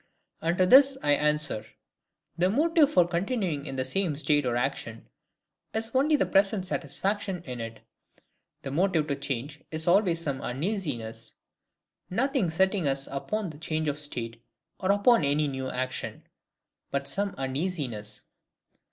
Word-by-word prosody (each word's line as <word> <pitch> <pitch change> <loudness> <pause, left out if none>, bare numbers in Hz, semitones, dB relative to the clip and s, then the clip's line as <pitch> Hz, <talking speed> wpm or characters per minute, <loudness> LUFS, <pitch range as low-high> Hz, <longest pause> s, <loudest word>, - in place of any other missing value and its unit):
And 170 +2 0
to 185 - +5
this 270 +6 +7
I 145 - +3
answer,—The 150 +4 -2
motive 305 - +4
for 175 - +5
continuing 175 - -1
in 135 - -5
the 130 0 -1
same 165 +3 0
state 145 -1 +1
or 120 - 0
action, 120 -3 -3 0.7
is 225 +1 -2
only 285 +4 +4
the - - +2
present 195 0 +2
satisfaction 195 -1 -2
in 125 -4 -6
it; 115 0 -7 0.8
the 135 - -4
motive 165 0 +2
to 140 - +1
change 140 +2 -4
is 160 +1 -5
always 175 -2 +4
some 140 -5 -3
uneasiness: 125 - -3 0.8
nothing 255 - +1
setting 190 0 +1
us 135 0 0
upon 190 +7 -2
the 150 - -13
change 155 -1 -2
of 145 0 -1
state, 115 -6 -2 0.4
or 190 +1 +2
upon 205 0 +4
any 145 +1 +2
new 130 -1 -3
action, 130 0 -4 0.7
but 140 0 -2
some 200 +3 -1
uneasiness. 130 - -3
155 Hz, 145 wpm, -28 LUFS, 135-195 Hz, 0.8 s, this